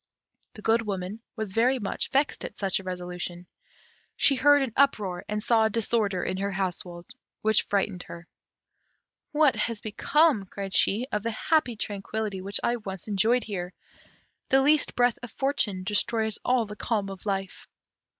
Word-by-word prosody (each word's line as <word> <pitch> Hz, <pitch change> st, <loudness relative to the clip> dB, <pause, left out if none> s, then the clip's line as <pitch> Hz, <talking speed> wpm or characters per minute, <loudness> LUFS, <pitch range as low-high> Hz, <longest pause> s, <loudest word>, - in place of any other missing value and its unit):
The 210 Hz, -, -11 dB
Good 225 Hz, +1 st, +3 dB
Woman 195 Hz, +2 st, -4 dB
was 220 Hz, -5 st, -4 dB
very 245 Hz, +5 st, +3 dB
much 205 Hz, -5 st, -3 dB
vexed 275 Hz, +2 st, +1 dB
at -, -, -7 dB
such 195 Hz, -2 st, 0 dB
a -, -, -10 dB
resolution. 180 Hz, -1 st, -5 dB, 0.7 s
She 280 Hz, -, +5 dB
heard 285 Hz, +1 st, +5 dB
an 245 Hz, -5 st, -4 dB
uproar, 205 Hz, -10 st, +2 dB
and 210 Hz, 0 st, -2 dB
saw 225 Hz, -2 st, +4 dB
a -, -, +2 dB
disorder 215 Hz, -4 st, 0 dB
in 185 Hz, -, -2 dB
her 200 Hz, +1 st, -1 dB
household, 180 Hz, -2 st, -3 dB, 0.4 s
which 220 Hz, 0 st, +4 dB
frightened 195 Hz, -2 st, -1 dB
her. 170 Hz, 0 st, -10 dB, 1.0 s
"What 300 Hz, -3 st, +4 dB
has 230 Hz, -2 st, -2 dB
become," 225 Hz, +1 st, +2 dB
cried 195 Hz, 0 st, -6 dB
she, 220 Hz, +5 st, +3 dB
"of 210 Hz, -, -1 dB
the 230 Hz, -, -2 dB
happy 250 Hz, +2 st, +1 dB
tranquillity 205 Hz, -1 st, -3 dB
which 200 Hz, +1 st, -1 dB
I 240 Hz, -, +1 dB
once 195 Hz, -4 st, -7 dB
enjoyed 220 Hz, +4 st, +2 dB
here! 180 Hz, -4 st, -5 dB, 0.8 s
The 270 Hz, 0 st, +4 dB
least 300 Hz, +2 st, +3 dB
breath 245 Hz, -1 st, +2 dB
of 240 Hz, -, -7 dB
fortune 235 Hz, -9 st, 0 dB
destroys 220 Hz, +2 st, +1 dB
all 245 Hz, -2 st, +2 dB
the 210 Hz, 0 st, -8 dB
calm 210 Hz, -3 st, -2 dB
of 195 Hz, +2 st, -9 dB
life!" 195 Hz, -1 st, -3 dB
210 Hz, 165 wpm, -27 LUFS, 195-240 Hz, 1.0 s, She